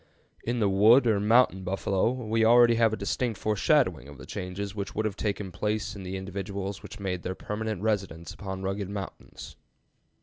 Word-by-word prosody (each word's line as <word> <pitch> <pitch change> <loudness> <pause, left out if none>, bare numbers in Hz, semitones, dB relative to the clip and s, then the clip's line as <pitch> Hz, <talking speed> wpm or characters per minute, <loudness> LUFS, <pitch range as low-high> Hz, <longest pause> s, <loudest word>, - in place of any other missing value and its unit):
In 120 +1 -1
the 105 - +3
"wood" 110 +7 +6
or 110 -3 +3
"mountain 105 -2 +3
buffalo" 95 +2 0
we 115 -3 0
already 120 +1 +6
have 115 -1 +3
a - - -1
distinct 120 -5 -2
foreshadowing 105 - +2
of 70 -1 -11
the - - -11
changes 95 +2 -5
which 100 -2 -5
would 110 - 0
have 105 -3 -2
taken 100 -2 -3
place 105 +3 -2
in 100 - -8
the 95 +1 -5
individuals 100 +1 -5
which 100 - -10
made 90 -3 -3
their 95 +2 -4
permanent 105 -1 -4
residence 95 -6 -2
upon 95 -1 -6
rugged 95 0 -3
mountains. 100 -1 -8
100 Hz, 180 wpm, -27 LUFS, 95-110 Hz, -, wood